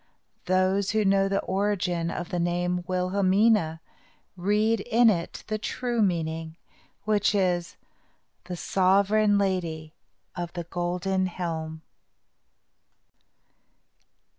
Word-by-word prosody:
Those 185 Hz, +2 st, +2 dB
who 215 Hz, -1 st, +1 dB
know 195 Hz, 0 st, +3 dB
the 195 Hz, 0 st, 0 dB
origin 190 Hz, -4 st, -1 dB
of 175 Hz, 0 st, -5 dB
the 175 Hz, -, -2 dB
name 175 Hz, +1 st, -1 dB
Wilhelmina 185 Hz, -1 st, +2 dB, 0.5 s
read 210 Hz, +4 st, +1 dB
in 230 Hz, +3 st, +4 dB
it 170 Hz, -4 st, -4 dB
the 215 Hz, 0 st, -3 dB
true 240 Hz, +1 st, -2 dB
meaning, 165 Hz, -4 st, -1 dB, 0.5 s
which 210 Hz, -1 st, +2 dB
is, 180 Hz, -3 st, 0 dB, 0.7 s
"The 180 Hz, 0 st, -6 dB
Sovereign 200 Hz, +4 st, +3 dB
Lady 170 Hz, -5 st, -2 dB, 0.4 s
of 175 Hz, -1 st, -5 dB
the 175 Hz, -, -4 dB
Golden 180 Hz, +2 st, -1 dB
Helm." 160 Hz, -3 st, -5 dB
185 Hz, 100 wpm, -26 LUFS, 175-200 Hz, 0.7 s, in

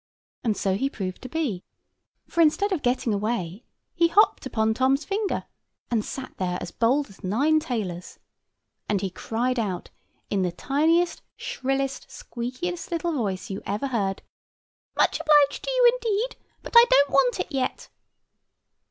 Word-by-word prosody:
And 220 Hz, -4 st, 0 dB
so 190 Hz, -1 st, 0 dB
he 270 Hz, +6 st, 0 dB
proved 185 Hz, -7 st, -5 dB
to 255 Hz, -, -8 dB
be; 250 Hz, -, -2 dB, 0.6 s
for 335 Hz, -, +1 dB
instead 365 Hz, +6 st, +3 dB
of 360 Hz, -6 st, 0 dB
getting 245 Hz, -3 st, +1 dB
away, 205 Hz, -1 st, -2 dB, 0.3 s
he 335 Hz, -1 st, +3 dB
hopped 410 Hz, +6 st, +3 dB
upon 220 Hz, 0 st, +1 dB
Tom's 265 Hz, +4 st, +2 dB
finger, 405 Hz, 0 st, -1 dB, 0.5 s
and 225 Hz, -3 st, +1 dB
sat 260 Hz, +3 st, -7 dB
there 180 Hz, -1 st, -1 dB
as -, -, -6 dB
bold 265 Hz, +5 st, +2 dB
as 195 Hz, -, -18 dB
nine 280 Hz, +12 st, +2 dB
tailors; 210 Hz, -, -4 dB, 0.7 s
and 205 Hz, -, +2 dB
he 195 Hz, -2 st, -2 dB
cried 240 Hz, +6 st, -1 dB
out 190 Hz, -5 st, -3 dB, 0.4 s
in 200 Hz, -, +1 dB
the 180 Hz, -1 st, 0 dB
tiniest, 320 Hz, -, +1 dB, 0.2 s
shrillest, 270 Hz, +1 st, -2 dB
squeakiest 255 Hz, +10 st, -5 dB
little 340 Hz, -1 st, -1 dB
voice 200 Hz, -7 st, -2 dB
you 195 Hz, -, -4 dB
ever 210 Hz, +7 st, -2 dB
heard, 200 Hz, -6 st, -1 dB, 0.7 s
"Much -, -, +3 dB
obliged 295 Hz, -2 st, +4 dB
to -, -, -2 dB
you, -, -, +5 dB
indeed; 470 Hz, -1 st, -1 dB, 0.3 s
but -, -, -9 dB
I 470 Hz, 0 st, +10 dB
don't 280 Hz, +1 st, +5 dB
want 265 Hz, -3 st, +3 dB
it -, -, -3 dB
yet." 265 Hz, -2 st, -2 dB
255 Hz, 155 wpm, -25 LUFS, 210-315 Hz, 0.7 s, I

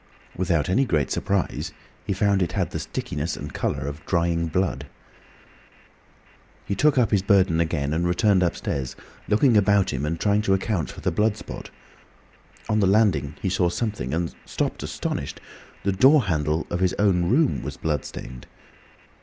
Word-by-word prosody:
Without 85 Hz, -5 st, 0 dB
any 110 Hz, +9 st, +3 dB
great 80 Hz, -, 0 dB
surprise 100 Hz, -3 st, -1 dB, 0.3 s
he -, -, -1 dB
found 100 Hz, 0 st, +2 dB
it 90 Hz, -, -1 dB
had -, -, -1 dB
the -, -, -3 dB
stickiness 75 Hz, +3 st, -4 dB
and -, -, -7 dB
colour -, -, -2 dB
of 70 Hz, +1 st, -6 dB
drying 85 Hz, -1 st, +1 dB
blood. 90 Hz, +3 st, -1 dB, 1.8 s
He -, -, -2 dB
took 145 Hz, +6 st, +3 dB
up 120 Hz, -5 st, +3 dB
his 100 Hz, -, +3 dB
burden 95 Hz, -4 st, +3 dB
again, 80 Hz, -3 st, 0 dB
and 85 Hz, +2 st, 0 dB
returned 95 Hz, +2 st, +3 dB
upstairs, 70 Hz, -7 st, -2 dB, 0.3 s
looking 115 Hz, +3 st, +4 dB
about 100 Hz, -3 st, +3 dB
him 65 Hz, +1 st, -2 dB
and 80 Hz, +2 st, -2 dB
trying 105 Hz, +2 st, +2 dB
to 95 Hz, -2 st, +2 dB
account 95 Hz, -4 st, -1 dB
for -, -, -9 dB
the -, -, 0 dB
blood 105 Hz, +5 st, +1 dB
spot. -, -, -8 dB, 1.0 s
On 110 Hz, -, +1 dB
the 100 Hz, -, +3 dB
landing 95 Hz, -8 st, +2 dB
he 95 Hz, -, +1 dB
saw 90 Hz, -2 st, +2 dB
something 100 Hz, -, -3 dB
and 85 Hz, +2 st, -1 dB
stopped -, -, -3 dB
astonished. -, -, -4 dB, 0.4 s
The 100 Hz, -, +1 dB
door 135 Hz, +9 st, +5 dB
handle 80 Hz, -4 st, 0 dB
of 85 Hz, -, -1 dB
his 95 Hz, 0 st, +1 dB
own 90 Hz, -4 st, +2 dB
room 145 Hz, +4 st, +2 dB
was -, -, -6 dB
blood 75 Hz, -2 st, -1 dB
stained. 65 Hz, 0 st, -9 dB
95 Hz, 170 wpm, -24 LUFS, 80-105 Hz, 1.8 s, door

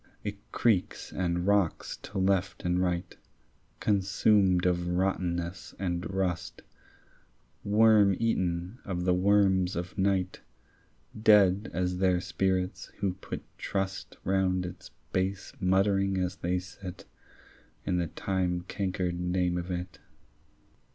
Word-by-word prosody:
It 100 Hz, -1 st, -7 dB
creaks 105 Hz, -7 st, +1 dB
and 90 Hz, -1 st, -1 dB
rocks 100 Hz, -4 st, +1 dB
to 100 Hz, -, -8 dB
left 95 Hz, 0 st, 0 dB
and 90 Hz, +1 st, +2 dB
right 90 Hz, 0 st, -1 dB, 0.6 s
Consumed 95 Hz, -2 st, +3 dB
of 90 Hz, -1 st, +1 dB
rottenness 90 Hz, -1 st, -1 dB
and 90 Hz, -1 st, -2 dB
rust, 90 Hz, -2 st, -2 dB, 1.0 s
Worm 105 Hz, -2 st, +5 dB
eaten 95 Hz, -1 st, -1 dB
of 90 Hz, -3 st, -3 dB
the 90 Hz, -, +4 dB
worms 95 Hz, -1 st, +3 dB
of 90 Hz, +2 st, -4 dB
night, 95 Hz, -1 st, +1 dB, 0.8 s
Dead 105 Hz, -2 st, +5 dB
as 90 Hz, 0 st, -1 dB
their 90 Hz, -2 st, +3 dB
spirits 95 Hz, 0 st, -1 dB
who 100 Hz, -2 st, 0 dB
put 95 Hz, -, -7 dB, 0.2 s
trust, 95 Hz, -1 st, -3 dB
Round 95 Hz, -1 st, +1 dB
its 90 Hz, +1 st, -9 dB, 0.2 s
base 95 Hz, +1 st, -1 dB
muttering 95 Hz, +1 st, +2 dB
as 90 Hz, +1 st, -1 dB
they 90 Hz, +1 st, 0 dB
sit, 90 Hz, 0 st, -8 dB, 0.8 s
In 90 Hz, -, 0 dB
the 85 Hz, -, 0 dB
time 90 Hz, +1 st, -1 dB
cankered 90 Hz, -1 st, -2 dB
name 90 Hz, 0 st, 0 dB
of 90 Hz, +1 st, -3 dB
it. 90 Hz, 0 st, -5 dB
95 Hz, 115 wpm, -29 LUFS, 90-95 Hz, 1.0 s, Worm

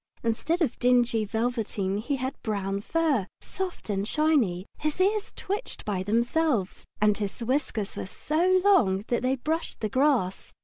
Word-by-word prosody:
Instead 290 Hz, +10 st, +1 dB
of 265 Hz, -, -2 dB
dingy 240 Hz, -3 st, +3 dB
velveteen 220 Hz, -3 st, -1 dB
he 275 Hz, +6 st, -1 dB
had 260 Hz, +1 st, -3 dB
brown 200 Hz, -3 st, -2 dB
fur, 290 Hz, -, +1 dB
soft 380 Hz, -2 st, -5 dB
and 200 Hz, -1 st, -1 dB
shiny, 255 Hz, -, +2 dB
his 305 Hz, +2 st, -2 dB
ears 410 Hz, +3 st, +1 dB
twitched 410 Hz, +5 st, -4 dB
by 200 Hz, -3 st, -1 dB
themselves, 235 Hz, -, 0 dB
and 210 Hz, 0 st, +3 dB
his 200 Hz, +1 st, -3 dB
whiskers 235 Hz, -4 st, -1 dB
were -, -, -5 dB
so 350 Hz, -, +2 dB
long 210 Hz, -, +4 dB
that 240 Hz, -, +1 dB
they 255 Hz, +2 st, +1 dB
brushed 315 Hz, +6 st, -3 dB
the 215 Hz, -, -2 dB
grass. 255 Hz, -8 st, +1 dB
240 Hz, 150 wpm, -27 LUFS, 205-310 Hz, -, long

